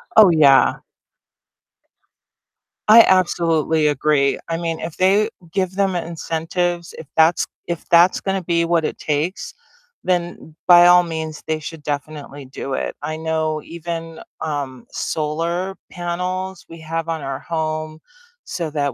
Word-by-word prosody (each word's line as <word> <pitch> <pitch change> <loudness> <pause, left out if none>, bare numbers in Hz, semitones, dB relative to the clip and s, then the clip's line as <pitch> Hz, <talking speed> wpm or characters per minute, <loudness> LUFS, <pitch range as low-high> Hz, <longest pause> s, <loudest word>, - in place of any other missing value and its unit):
Oh, 215 -4 +8
yeah. 145 -4 +5 2.1
I 230 +1 +10
absolutely 165 -4 +2
agree, 145 -1 +2
I 165 - -1
mean, 165 -1 -3
if 160 -1 -6
they 200 +4 +3 0.2
give 185 0 -1
them 195 -2 +1
incentives, 170 +1 -3
if 155 - -10
that's 160 +2 +4 0.2
if 170 -2 -5
that's 175 +2 +5
gonna 195 -1 -2
be 170 0 +1
what 170 -1 +1
it - - -3
takes, 155 +5 -2 0.5
then 175 -3 -2
by 175 0 +8
all 180 0 +7
means, 160 -2 -5
they 155 0 -1
should 155 0 -8
definitely 145 -1 -5
do 135 +1 -6
it. - - -2
I 155 +1 -4
know 160 -1 -2
even, 165 -1 -6 0.2
um, 140 -5 -4
solar 170 +5 -2
panels 180 +1 -4
we 165 0 -12
have 165 +1 -4
on 165 -1 -3
our 135 -1 -4
home 155 -1 -4 0.4
so 170 -4 -4
that 145 -2 -1
165 Hz, 135 wpm, -20 LUFS, 155-175 Hz, 2.1 s, I